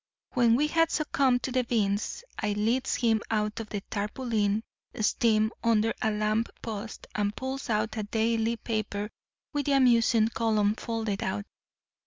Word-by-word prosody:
"When 235 -2 +4
we 290 +5 +3
had 330 +2 +3
succumbed 270 -6 +1
to 265 - -2
the 255 0 +2
beans 215 - -1 0.2
I 210 -1 0
leads 230 +6 +1
him 225 -3 +2
out 210 -1 0
of 220 -2 -6
the 205 - -3
tarpaulin 210 0 0 0.4
steam 220 0 +2
under 225 -1 +3
a 220 - +2
lamp 215 +1 0
post 220 -1 -6
and 205 0 -1
pulls 265 0 -4
out 215 0 0
a - - 0
daily 225 +2 0
paper 210 -2 -3 0.4
with 290 -1 -1
the 285 - +3
amusement 230 -4 +4
column 215 -2 +2
folded 220 -3 -3
out. 200 +2 -2
225 Hz, 155 wpm, -28 LUFS, 210-240 Hz, 0.4 s, When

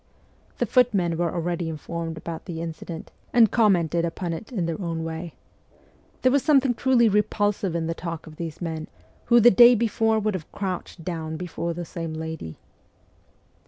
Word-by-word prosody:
The - - +1
footmen 200 -10 +2
were 170 0 0
already 170 -1 -2
informed 165 +1 -5
about 165 +1 -6
the 170 -4 -5
incident, 165 0 -7 0.2
and 230 -4 +6
commented 175 -7 +3
upon 170 +1 -3
it 190 +9 -8
in 190 -8 -1
their 165 +3 -3
own 165 -2 -3
way. 165 +1 -6 0.9
There 255 - +5
was 280 +1 +3
something 270 -4 +4
truly 245 -1 +3
repulsive 205 -3 +1
in 165 -1 -1
the 165 - -1
talk 165 -1 -6
of 155 -1 -12
these 165 -1 -6
men, 160 -2 -4 0.4
who 240 0 +6
the 240 +1 +7
day 240 +4 +8
before 225 0 +1
would 215 -1 0
have 175 -5 -6
crouched 185 -3 -5
down 160 -3 -4
before 170 -1 -4
the 175 0 -5
same 165 -1 -5
lady. 160 - -6
170 Hz, 170 wpm, -25 LUFS, 165-210 Hz, 0.9 s, day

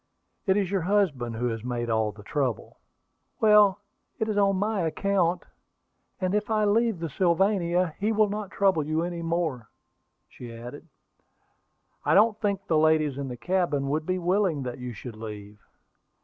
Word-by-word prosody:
"It 190 +1 +3
is 195 -2 0
your 195 -2 +1
husband 160 - 0
who 120 +2 -1
has 115 -1 -5
made 120 -1 -3
all 110 -2 +1
the 105 0 -14
trouble." 130 -1 -3 0.6
"Well, 210 -2 +5 0.4
it 220 - -1
is 215 - -1
on 200 -1 +3
my 205 +1 0
account; 175 +2 0 0.8
and 185 0 -1
if 210 +1 0
I 215 -1 +2
leave 225 0 +2
the 165 0 -4
Sylvania, 180 +1 +1
he 210 +2 +1
will 215 -1 +3
not 205 -1 -4
trouble 190 -6 +2
you 155 +2 -1
any 175 -1 -4
more," 165 -8 -2 0.6
she 120 -1 -11
added. 120 +7 -9 1.2
"I - - +2
don't 215 +1 +4
think 200 -2 -1
the 160 -4 +2
ladies 155 -3 +3
in 140 - -3
the 125 -1 -6
cabin 170 -5 0
would 155 +2 -1
be 185 0 0
willing 180 -4 +1
that 125 -1 -6
you 125 0 -5
should 115 +1 -9
leave." 105 -1 -9
170 Hz, 170 wpm, -26 LUFS, 130-200 Hz, 1.2 s, Well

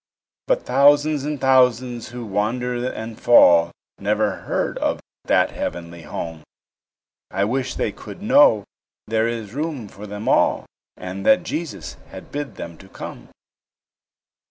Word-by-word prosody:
But - - +1
thousands 145 +1 +4
and 150 -1 -3
thousands 125 -2 +2
who 120 0 -7
wander 120 +5 -1
and 110 0 -7
fall, 85 -8 +6 0.3
Never - - 0
heard - - -2
of - - 0 0.3
that - - +3
heavenly 85 -1 -5
home; 80 +1 -6 0.9
I 100 +2 0
wish 130 +3 -2
they 105 - -1
could 180 - -11
know 220 - +5 0.4
there 110 +1 +1
is 115 -3 -4
room 145 -5 -3
for 105 +1 -11
them 105 +1 -6
all, - - +3 0.3
And 90 +2 -6
that 180 -1 +5
Jesus 165 -2 -5
has - - -9
bid 145 -1 -6
them 85 -1 -8
to 95 - -15
come. - - -9
120 Hz, 135 wpm, -22 LUFS, 100-140 Hz, 0.9 s, fall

